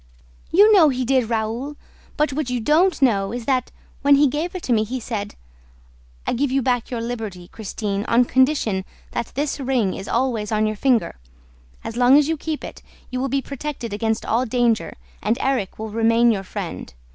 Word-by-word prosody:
"You 410 +5 +6
know 340 -7 +7
he 255 -1 -1
did, 255 -2 +2
Raoul! 230 +6 -2 0.4
But 300 -2 +1
what 290 -2 -2
you 250 -1 -1
don't 315 +9 +3
know 200 -6 +2
is 240 -1 -5
that, 255 -3 0 0.3
when 285 0 +6
he 290 +1 +5
gave 310 +7 -3
it 370 - -5
to 250 - +1
me, 215 -1 +3
he 250 +4 -4
said, 215 -3 -5 0.9
'I - - 0
give 275 +2 0
you 270 0 +1
back 245 -2 0
your 240 -2 -3
liberty, 220 -7 -5
Christine, 205 -1 -4
on 240 +2 +3
condition 260 -7 +2 0.3
that 235 - -3
this 290 +1 -1
ring 255 -7 0
is 195 - -7
always 235 -4 -1
on 215 0 +2
your 215 0 -1
finger. 235 - +1 0.6
As 225 - -6
long 250 +3 +6
as 295 -1 +4
you 325 - 0
keep 310 0 -4
it, - - -8 0.3
you 255 - -2
will 270 +1 -1
be 275 +1 0
protected 275 -5 -5
against 220 +1 -1
all 235 +3 +1
danger 235 -2 +1 0.3
and 235 - +1
Erik 260 -8 -1
will 220 0 -5
remain 230 +2 +3
your 200 -3 -1
friend. 185 - -6
245 Hz, 195 wpm, -22 LUFS, 220-275 Hz, 0.9 s, know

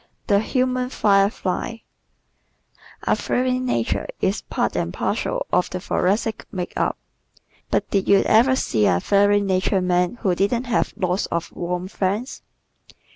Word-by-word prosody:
The 200 -4 +3
Human 255 +2 0
Firefly 195 -4 +1
¶ 230 - -13 1.2
A - - +2
fiery 255 0 0
nature 115 - -1
is 195 +3 0
part - - -2
and - - -1
parcel - - -2
of 180 - +2
the 180 - -4
Thoracic's 210 +5 -1
makeup. 180 -2 -2 0.7
But - - 0
did 195 -1 +1
you 200 -1 +5
ever 250 +4 +4
see 110 - +1
a 90 - +3
fiery 205 - +3
natured 190 -1 +1
man 180 +3 +1
who 190 -4 +2
didn't 200 +7 0
have 245 -2 0
lots 185 +1 0
of 170 0 -3
warm 180 +1 -3
friends! 205 +6 -2
200 Hz, 140 wpm, -22 LUFS, 180-230 Hz, 1.2 s, you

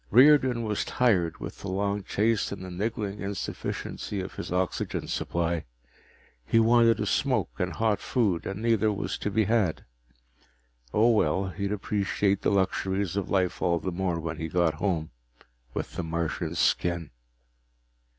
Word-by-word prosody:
Riordan 130 -1 +6
was 105 -2 -1
tired 95 -10 +1
with - - -7
the - - -7
long 100 +2 -1
chase 110 +3 +1
and 95 -2 -6
the 90 - -7
niggling 105 +1 -3
insufficiency 100 0 -4
of 95 +1 -5
his - - -6
oxygen 90 0 -1
supply. 85 -1 -1 0.8
He 115 - +3
wanted 115 0 +5
a - - 0
smoke - - +1
and 90 -1 -1
hot 110 +2 +1
food, 105 -10 0
and 100 +3 -5
neither 110 -2 +3
was 100 - -3
to - - -1
be 110 +2 +2
had. 105 -5 +1 1.1
Oh, 115 - +4
well, 95 -2 +2
he'd 100 +3 -3
appreciate 100 -1 0
the - - +2
luxuries 95 -1 0
of 100 -2 -2
life 95 -2 0
all 85 -1 +2
the 95 +3 -3
more 90 -1 -1
when 80 -1 -4
he 80 - -3
got 85 -1 +2
home 80 -2 -1 0.6
with - - -4
the - - -1
Martian's 85 0 -2
skin. 85 -4 +1
100 Hz, 155 wpm, -27 LUFS, 85-105 Hz, 1.1 s, Riordan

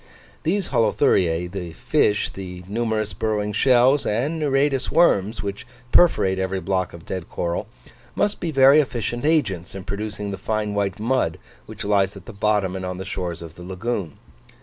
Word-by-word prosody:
These 190 +3 0
Holuthuriae, 90 -6 +2
the 90 -4 -6
fish, 105 +5 +1
the 90 -2 -8
numerous 110 0 -1
burrowing 105 -1 -1
shells, 130 +4 +4
and 145 +10 -1
nereidous 135 -2 +1
worms, 105 - +3
which 100 +3 -5 0.2
perforate 95 - +4
every 95 0 -1
block 95 -1 -1
of 85 0 -11
dead 95 -3 -5
coral, 85 0 -2 0.5
must 205 0 0
be 170 - -2
very 135 0 +6
efficient 120 -2 -2
agents 100 - 0
in 95 - -6
producing 105 +1 -4
the 100 - -4
fine 110 -1 -2
white 100 -1 -1
mud 115 -8 0 0.3
which - - -7
lies 100 -1 +2
at 95 - -13
the - - -9
bottom 100 -2 +1
and 95 - -5
on 90 0 -4
the 95 - -6
shores 90 -3 -4
of 80 -2 -10
the 90 - -12
lagoon. 95 -2 -4
105 Hz, 170 wpm, -23 LUFS, 95-120 Hz, 0.5 s, very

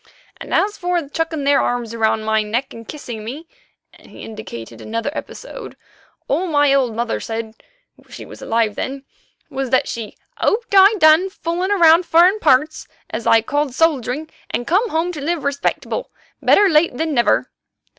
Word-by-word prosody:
"And - - -10
as 415 +1 +1
for 350 -4 -1
chucking 320 -1 -2
their 280 0 +3
arms 240 -2 -2
round 220 -1 0
my 220 0 +2
neck 230 +6 -3
and 230 -1 -11
kissing 240 -7 -7
me," 280 +9 -7 0.5
and - - -19
he - - -12
indicated 120 - -9
another 230 +5 -3
episode, - - -8 0.5
"all 340 +7 0
my 290 -3 +3
old 255 -5 +1
mother 235 0 -2
said—she 230 - -9
was - - -12
alive 225 -2 0
then—was 270 +2 -7
that 260 0 +2
she 225 -3 -6 0.2
'hoped 455 0 0
I'd 395 +2 +7
done 315 +2 +5
fooling 350 +1 -3
about 340 -3 +5
furrin' 355 +6 +4
parts 300 -1 +2 0.2
as 235 - -4
I 225 -1 +5
called 290 +1 -1
soldiering, 300 -2 0 0.2
and 240 - -3
come 400 - +1
home 330 +1 -1
to 305 -5 -7
live 330 +1 -2
respectable, 280 - -2 0.3
better 410 - +5
late 305 -6 +2
than 320 +1 -1
never. 240 -3 +2
285 Hz, 160 wpm, -19 LUFS, 230-340 Hz, 0.5 s, I'd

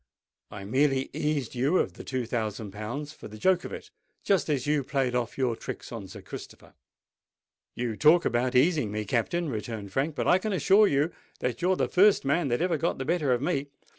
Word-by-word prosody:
I 100 -2 -8
merely 135 +4 +1
eased 150 -5 -1
you 135 +8 +2
of - - 0
the - - -10
two 130 -2 -3
thousand 110 -3 -3
pounds 120 +9 -5
for - - -10
the 110 - -11
joke 185 +9 +2
of - - -6
it—just 195 -5 -3
as 140 -4 0
you 145 -1 +1
played 130 -2 -1
off 120 -2 -2
your 125 -3 +1
tricks - - -7
on 110 -5 -6
Sir - - -11
Christopher." - - -10 1.0
"You 120 -2 -2
talk 155 +7 +5
about 120 +1 0
easing 140 - +3
me, 105 0 -3
Captain," 130 - 0
returned 110 -5 -5
Frank; 145 +3 0
"but - - -1
I 180 - +5
can 215 +1 -2
assure 195 +6 +5
you 145 +1 +1 0.3
that 125 +6 -2
you're 185 +2 +3
the - - 0
first 195 -3 +4
man 145 +3 +1
that 120 +5 0
ever 180 -1 +1
got 170 - -1
the 135 - -4
better 155 -3 +1
of 125 +1 +1
me. 145 -3 -1
135 Hz, 205 wpm, -27 LUFS, 120-165 Hz, 1.0 s, talk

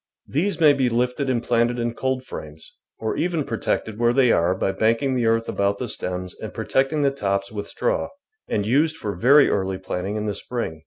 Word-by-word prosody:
These 180 +8 -1
may 155 -3 +7
be 135 -3 +1
lifted 125 +3 0
and 120 -2 0
planted 120 0 +1
in 120 -1 -1
coldframes, 130 - -5 0.3
or 110 - -2
even 170 -3 0
protected 110 -2 -2
where 120 0 +3
they 125 -2 +4
are 85 +2 +2
by 95 - 0
banking 115 +6 +1
the 120 -3 +1
earth 115 0 +2
about 100 0 0
the 125 - -4
stems 90 -3 -4
and - - -6
protecting 140 +3 0
the 140 - +3
tops 100 -6 -2
with 100 -1 -5
straw, - - -1 0.4
and 105 - -1
used 150 +8 +2
for 105 -8 -4
very 135 +10 +6
early 95 -1 0
planting 95 +2 -4
in 105 0 -2
the 105 - -1
spring. 105 -6 -4
115 Hz, 200 wpm, -23 LUFS, 100-130 Hz, 0.4 s, may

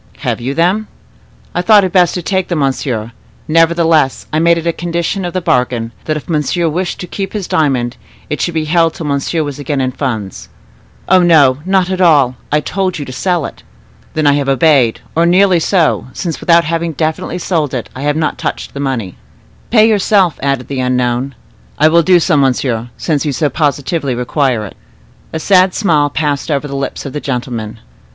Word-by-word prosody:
"Have - - -2
you 135 +4 -3
them?" 185 +6 +1 0.7
"I 175 - 0
thought 210 +1 +5
it 185 - -1
best 180 -2 +3
to 180 - -3
take 190 0 -1
them, 175 - -2
monsieur; 130 -5 -2 0.4
nevertheless, 165 -3 +2
I 155 - +2
made 170 +1 +4
it 165 - -4
a 170 - +1
condition 170 +3 -2
of 175 - -4
the 185 - -1
bargain, 125 -5 0
that 155 -1 -1
if 150 - -9
monsieur 165 +2 0
wished 175 +3 -2
to - - -4
keep 195 +1 -5
his 205 -4 -4
diamond, 130 -6 0 0.3
it 150 - -3
should 175 - -2
be 155 -1 0
held 165 +1 +2
till 165 - -6
monsieur 145 +3 -1
was 145 -1 -6
again 145 0 -2
in 130 -1 0
funds." 110 -8 -4 0.6
"Oh, 185 -1 +5
no, 145 -7 +4
not 190 -1 +2
at 185 0 -1
all: 145 -8 +4 0.2
I 150 +1 +2
told 190 +2 -2
you 145 - -5
to 130 - -8
sell 175 +2 -1
it." - - -9 0.5
"Then 155 -1 0
I 145 - +5
have 140 -1 0
obeyed, 135 -4 +3
or 165 +1 +3
nearly 185 0 +4
so, 165 -4 +1
since, 170 -4 -4
without 170 0 +4
having 165 +1 -2
definitely 155 +3 -2
sold 165 -6 -1
it, 120 - -4
I 130 - -7
have 145 +2 0 0.2
touched - - -4
the 140 - -6
money." 125 -10 -3 0.5
"Pay 220 -2 +5
yourself," 200 -5 +2
added 135 -2 -1
the 135 -2 -4
unknown. 125 +1 -1 0.4
"I 155 - +5
will 170 +1 +4
do 180 +2 +4
so, 170 0 +1
monsieur, 125 -3 0
since 150 -4 -1
you 150 - -1
so 145 +4 0
positively 145 -1 -1
require 125 -2 0
it." 100 - -10 0.6
A 160 - -3
sad 185 +1 +3
smile 155 -8 +2
passed 145 -1 -2
over 145 -1 -1
the 140 - -6
lips 135 +1 -4
of 135 - -6
the 150 - -4
gentleman. 120 -4 -4
155 Hz, 200 wpm, -14 LUFS, 135-175 Hz, 0.7 s, thought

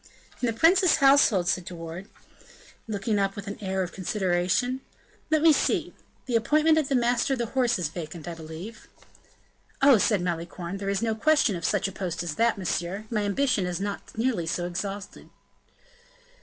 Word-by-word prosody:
"In 245 - +1
the 230 - 0
prince's 360 +1 +5
household," 270 -10 +4
said 180 -1 0
De 180 - -7
Wardes 165 +3 -8 0.8
looking 210 0 -1
up 195 0 0
with 200 - -7
an 200 0 -7
air 190 -1 -1
of 180 - -6
consideration, 190 +6 0 0.5
"let 310 0 +2
me 325 -1 +7
see - - 0 0.3
the 245 - -2
appointment 305 +7 +3
of 295 - -2
the 275 - +1
master 245 +2 +2
of - - -1
the 240 - -1
horse 245 -3 +2
is 175 -4 -1
vacant, 165 0 -8
I 170 - -4
believe." 165 +7 -9 0.9
"Oh," 275 -5 +6
said 205 -2 +2
Malicorne, 170 +1 -4
"there 195 0 -4
is 200 +2 -1
no 225 -1 +1
question 250 -2 +2
of 170 - -6
such 205 -2 +1
a - - -6
post 180 -3 -4
as 170 -3 -3
that, 230 +5 +1
monsieur; 190 +2 -3
my 215 -2 0
ambition 205 -1 +1
is 180 0 -3
not 200 +2 -5
nearly 225 -8 0
so 175 +1 -1
exalted." 195 +3 -6
200 Hz, 185 wpm, -26 LUFS, 180-245 Hz, 0.9 s, me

